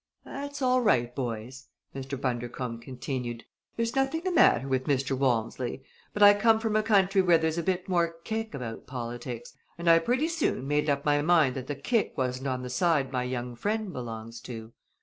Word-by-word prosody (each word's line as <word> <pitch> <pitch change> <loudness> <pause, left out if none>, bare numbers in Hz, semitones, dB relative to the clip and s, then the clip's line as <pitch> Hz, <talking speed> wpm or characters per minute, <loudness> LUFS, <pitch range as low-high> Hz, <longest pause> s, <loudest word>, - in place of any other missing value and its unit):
"That's 285 0 -6
all 255 0 +3
right, 120 - +2
boys!" 125 +1 -5 0.3
Mr. 135 0 -5
Bundercombe 120 -2 -3
continued, 125 -2 -5 0.3
"there's 230 +1 -1
nothing 270 +4 +1
the 370 +1 -1
matter 135 - +4
with 130 -1 0
Mr. 135 -1 0
Walmsley; 125 0 -1 0.3
but 205 - +2
I 205 0 +10
come 220 +2 +4
from 220 -1 -1
a 215 - +4
country 200 -3 +3
where 175 -2 +5
there's 160 +1 0
a - - +1
bit 180 +1 -1
more 170 -3 +1
kick 220 0 -3
about 115 -4 -6
politics, 120 -1 -6 0.2
and 170 0 -5
I 165 0 +7
pretty 250 - +1
soon 325 - -1
made 150 +1 +1
up 140 0 0
my 145 0 +3
mind 155 -5 +3
that 130 -1 -5
the 145 - -3
kick 210 - -1
wasn't 130 +1 -1
on 130 -1 -2
the 125 - -5
side 150 -1 +1
my 125 -1 -1
young 125 -1 -4
friend 210 - -2
belongs 115 -1 -6
to. 115 -2 -8
140 Hz, 190 wpm, -28 LUFS, 125-200 Hz, 0.3 s, I